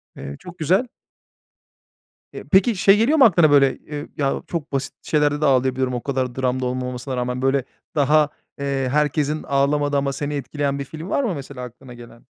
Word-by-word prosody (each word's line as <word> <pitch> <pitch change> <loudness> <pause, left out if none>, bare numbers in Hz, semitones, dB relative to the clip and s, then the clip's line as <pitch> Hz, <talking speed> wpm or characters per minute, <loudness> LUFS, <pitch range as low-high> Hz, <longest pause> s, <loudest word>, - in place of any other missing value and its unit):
Eee, 70 - -7
çok 180 0 -11
güzel. 185 - +2 1.5
Eee, - - -7
peki 200 +4 +4
şey 195 +2 +5
geliyor 250 +9 +3
mu 270 - +8
aklına, 170 -8 +5
böyle? 140 -2 +4
Eee, 150 0 -7
ya 140 -2 0
çok 160 -3 -4
basit 135 -1 -2
şeylerde 150 -1 +1
de - - +2
ağlayabiliyorum, 130 -1 +2
o 120 - -3
kadar 130 -3 -2
dram 130 -1 -1
da - - -1
olmamasına 125 +1 -3
rağmen. 125 +1 -2
Böyle 135 0 +2 0.3
daha, 150 +1 +4 0.3
eee, 135 -2 -1
herkesin 150 +1 0
ağlamadığı 145 +1 +1
ama 140 0 0
seni 145 +1 -3
etkileyen 140 +1 -2
bir 140 - -4
film 160 +6 -8
var 280 - +1
mı 210 -9 -1
mesela 140 -2 -8
aklına 125 +1 -11
gelen? 120 -1 -14
140 Hz, 185 wpm, -22 LUFS, 130-150 Hz, 1.5 s, mu